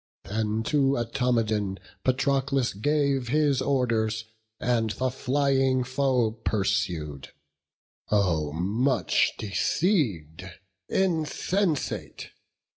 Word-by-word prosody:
Then 110 +1 -1
to 140 +1 +2
Automedon 115 -5 0 0.3
Patroclus 135 0 +1
gave 140 +3 0
His 145 0 +2
orders, 115 -5 0 0.3
and 115 -2 +1
the 130 +4 -1
flying 135 -1 +1
foe 130 -3 +1
pursued. 95 - -2 0.8
Oh 85 -8 +1
much 100 - +1
deceiv'd, 100 - 0 0.5
insensate! 180 -1 -1
125 Hz, 75 wpm, -26 LUFS, 105-140 Hz, 0.8 s, to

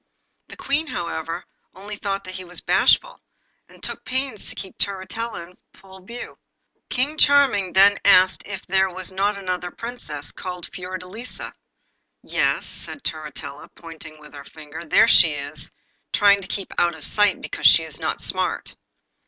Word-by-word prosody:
The - - -11
Queen, 295 +4 0
however, 165 - -4 0.3
only 205 +3 -7
thought 200 -1 -3
that 185 - -7
he 185 - -5
was 180 0 -6
bashful, - - +3 0.5
and - - -18
took - - -2
pains 260 -3 -2
to - - -5
keep 190 -1 -8
Turritella 200 +1 -2
in 180 - -20 0.2
full 190 -1 -14
view. 235 +5 -9 0.5
King 285 +5 -1
Charming 265 -10 +4
then 200 +1 +6
asked 185 -2 +6
it 195 -2 -6
there 190 0 +3
was 185 +1 -5
not 200 +2 0
another 180 -2 -3
Princess, 175 -10 -6
called 180 -1 -7
Fiordelisa. 185 +6 -6 0.7
'Yes,' - - +1
said 285 - -6
Turritella, 150 -2 -6
pointing 160 -2 -10
with 150 0 -14
her 140 -1 -9
finger, 155 +2 -10
'there 215 +8 +5
she 165 -8 +6
is, 140 0 -2 0.4
trying 200 -1 +5
to 195 - -7
keep 195 -1 -4
out 170 -1 +2
of 155 - -6
sight 205 -2 +3
because - - +2
she - - +7
is - - -6
not - - -2
smart. - - -2
190 Hz, 160 wpm, -23 LUFS, 170-205 Hz, 0.7 s, she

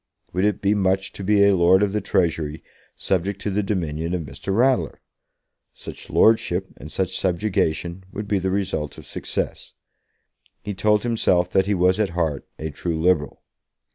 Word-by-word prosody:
Would 90 +3 +1
it 105 -1 0
be 100 +1 +3
much 95 -1 +1
to 100 - -7
be 100 +1 +4
a 100 -1 +5
Lord 90 +2 +5
of 100 -1 0
the 105 - 0
Treasury, 80 -5 -1 0.3
subject 95 +1 -1
to 105 - -1
the 100 +2 +1
dominion 85 -4 -2
of 85 - -3
Mr. 70 +7 -6
Ratler? 110 - +2 0.8
Such - - -9
lordship 95 -4 +3
and 75 +3 -10
such 95 -1 -2
subjection 90 -1 -1
would 105 0 -5
be 100 -1 +1
the 95 +1 -1
result 95 -6 -2
of - - -11
success. - - -4 0.9
He 105 - -4
told 105 +2 +2
himself 95 -7 +1
that 95 0 +2
he 105 - +2
was 90 +2 +3
at 105 -3 +2
heart 80 -5 -1
a 80 0 -5
true 80 +2 -3
Liberal. 80 -3 +1
95 Hz, 170 wpm, -23 LUFS, 85-100 Hz, 0.9 s, a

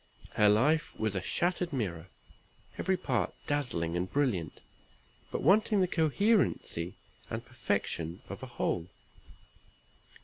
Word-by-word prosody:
Her 105 -1 +5
life 145 +10 +3
was 110 -2 0
a 95 - -1
shattered 175 - 0
mirror; 95 - -3 0.7
every 190 +1 +1
part 125 - -1
dazzling 105 - -1
and 90 +2 -2
brilliant, 120 - 0 0.7
but - - -3
wanting 205 +5 +4
the 185 - +3
coherency 165 - +1 0.3
and 115 +2 -4
perfection 100 -8 -2
of - - -7
a - - -6
whole. 85 0 -2
120 Hz, 115 wpm, -31 LUFS, -, 0.7 s, Her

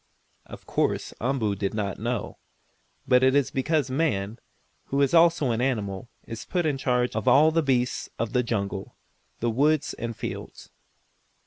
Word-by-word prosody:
Of - - -11
course - - -1
Umboo 120 -4 0
did 100 +1 -2
not 100 -4 -2
know, 120 +1 -3 0.7
but 125 0 +5
it 130 +1 +4
is 140 -1 +2
because 140 0 0
man, 115 -7 -1 0.5
who 140 - -1
is 140 - +1
also 165 -6 +5
an 115 +1 -1
animal, 115 -3 -2 0.2
is 115 -1 -7
put 175 -2 -1
in 145 -3 0
charge 125 -1 0
of 110 - -2
all 155 +3 +6
the 165 +1 +2
beasts 125 -4 0
of 115 -1 -2
the 125 - +3
jungle, 100 -5 -3 0.5
the 120 0 +1
woods 150 +5 +2
and 115 -1 -5
fields. - - -7
125 Hz, 160 wpm, -26 LUFS, 110-140 Hz, 0.7 s, all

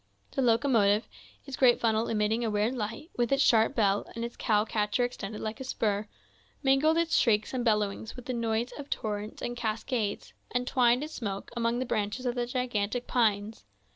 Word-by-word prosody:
The - - -1
locomotive, 225 -4 +3 0.4
its 275 - -6
great 250 -3 +5
funnel 225 0 +1
emitting 220 +1 0
a 225 - 0
weird 210 +3 +1
light, 230 - -5
with 240 0 +1
its 275 0 +4
sharp 225 -1 +4
bell, 205 -3 +2
and 230 0 -3
its 235 - -7
cow 210 -1 +2
catcher 210 +2 0
extended 220 -4 -4
like 220 +4 -4
a - - -5
spur, 215 -5 -1 0.6
mingled 275 +4 +4
its 335 0 +1
shrieks 215 -1 +2
and 250 -2 -1
bellowings 210 -1 0
with 250 -2 -10
the 255 - -3
noise 230 0 -1
of 285 - -8
torrents 210 0 -4
and 240 - -3
cascades, 220 -1 -2 0.2
and 245 0 -1
twined 250 0 +3
its 310 - -7
smoke 200 -4 -5
among 235 0 0
the 255 - -1
branches 215 +2 -2
of 245 - +1
the 240 -1 -2
gigantic 245 -2 -1
pines. 215 -3 0
230 Hz, 190 wpm, -29 LUFS, 210-250 Hz, 0.6 s, great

